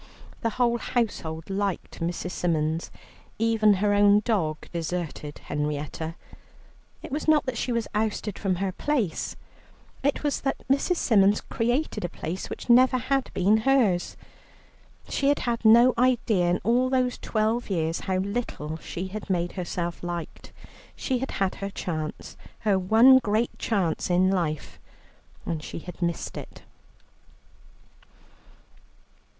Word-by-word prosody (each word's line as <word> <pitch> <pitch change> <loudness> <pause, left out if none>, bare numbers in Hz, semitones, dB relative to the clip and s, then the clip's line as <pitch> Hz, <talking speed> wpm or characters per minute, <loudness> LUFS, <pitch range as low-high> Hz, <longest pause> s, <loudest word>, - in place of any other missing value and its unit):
The 230 - +1
whole 235 -1 +2
household 165 -11 -2
liked 195 -1 -2
Mrs. 175 +1 -3
Symons; 160 -2 -1 0.5
even 220 -2 +3
her 205 +2 +1
own 205 0 +5
dog 180 -9 -1
deserted 165 -3 -4
Henrietta. 150 +2 -3 0.9
It - - -8
was 295 +3 -3
not 310 -2 +4
that 255 -2 -2
she 245 - -2
was 235 -1 -1
ousted 210 -1 -2
from 195 -3 0
her 190 +1 -1
place, 235 - -1 0.7
it 285 +2 0
was 290 -1 0
that 270 - -3
Mrs. 275 +7 +2
Symons 205 - +4
created 240 +4 -1
a 175 - -2
place, 170 +2 -5
which - - -7
never 255 +1 +6
had 265 +2 0
been 200 +4 +4
hers. 220 -7 +2 0.9
She 275 - 0
had 285 0 +3
had 235 -2 -1
no 235 +3 +7
idea 230 -8 +2
in 175 - +1
all 245 +4 +2
these 255 -1 +1
twelve 220 +2 0
years 165 -3 0
how 190 -1 -1
little 190 -6 -3
she 180 +3 -6
had 210 +1 -7
made 175 -2 0
herself 175 -2 -4
liked. 175 -1 -6 0.4
She 260 -2 -1
had 265 - -3
had 195 -1 -1
her 195 - -2
chance, 155 -5 -5 0.3
her 205 -4 +2
one 225 +8 +7
great 220 0 0
chance, 185 -8 0
in 185 +1 +3
life, 165 -5 -2 0.7
and 160 -2 -3
she - - -6
had 180 +2 -9
missed 170 -1 -2
it. - - -9
205 Hz, 140 wpm, -26 LUFS, 175-240 Hz, 0.9 s, no